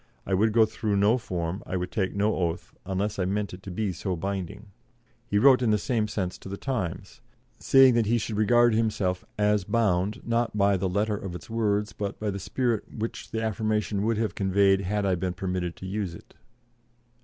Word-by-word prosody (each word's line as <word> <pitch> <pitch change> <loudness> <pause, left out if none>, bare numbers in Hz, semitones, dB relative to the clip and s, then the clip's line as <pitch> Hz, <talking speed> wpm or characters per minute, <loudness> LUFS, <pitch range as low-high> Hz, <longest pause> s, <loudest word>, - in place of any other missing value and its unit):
I - - -2
would 110 +4 +3
go 110 0 +5
through 110 -1 -2
no 105 +5 +3
form, 90 -4 -3
I 95 - -2
would 90 0 -4
take 95 -3 -1
no 105 +2 +1
oath, 85 -1 -2
unless 100 +2 -2
I 90 - +1
meant 100 +1 -2
it 90 - -9
to 95 - -9
be 100 +2 -2
so 90 +2 -3
binding." 100 +3 -5 0.6
He 100 - +1
wrote 130 +3 +6
in 120 - +2
the 105 - +4
same 110 0 0
sense 95 -4 -3
to - - -10
the 100 - -5
Times, 100 -5 -4 0.4
saying 135 -1 +6
that 115 -2 +2
he 120 +2 +3
should 110 -1 -3
regard 120 +3 +4
himself 105 -5 0
"as 105 -1 +2
bound, 100 -2 +1
not 115 -2 0
by 100 0 +4
the 95 0 -1
letter 105 +3 0
of 95 -3 -6
its 90 - -10
words, 105 -2 0
but 100 -1 -4
by 105 -1 -1
the 100 - -5
spirit 120 +3 -1
which 115 +1 -5
the 110 0 -3
affirmation 110 -2 -1
would 110 +1 +1
have 110 -1 -1
conveyed, 95 0 +3
had 100 +2 -1
I 95 - +2
been 90 0 -2
permitted 90 -1 -3
to - - -9
use 95 -3 -3
it." - - -15
105 Hz, 210 wpm, -27 LUFS, 95-110 Hz, 0.6 s, wrote